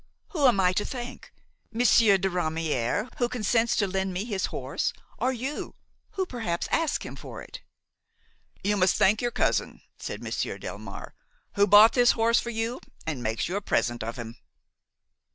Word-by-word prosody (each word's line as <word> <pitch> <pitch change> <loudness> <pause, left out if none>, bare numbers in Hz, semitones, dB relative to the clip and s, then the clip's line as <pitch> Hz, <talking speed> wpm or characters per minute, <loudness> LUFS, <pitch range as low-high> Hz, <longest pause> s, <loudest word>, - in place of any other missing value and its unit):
Whom 295 -7 +3
am 235 -6 +4
I 180 -1 +3
to 205 - 0
thank–Monsieur 235 -3 0
de 190 +1 0
Ramière, 165 - -1
who 240 -1 +1
consents 230 -1 +1
to 205 - +2
lend 190 0 -1
me 190 +4 -2
his 200 -5 -1
horse, - - -3 0.3
or 255 - +1
you, 260 +4 -5 0.4
who 380 -1 -1
perhaps 225 - -3
asked 330 -3 +1
him - - -7
for - - -9
it?" - - -10 1.0
"You 205 +1 +1
must 185 -1 +3
thank 205 +3 +3
your 240 - +1
cousin," - - -1 0.2
said - - -6
Monsieur - - -3
Delmare, - - -8 0.4
"who 205 0 +3
bought 210 +3 +8
this 245 0 +5
horse 230 +1 +3
for 235 - -4
you 230 +2 -2 0.3
and 150 -6 -3
makes 110 -2 -1
you 180 - -3
a - - -3
present 120 -10 0
of 115 +1 -4
him." 115 -1 -8
205 Hz, 170 wpm, -27 LUFS, 180-240 Hz, 1.0 s, bought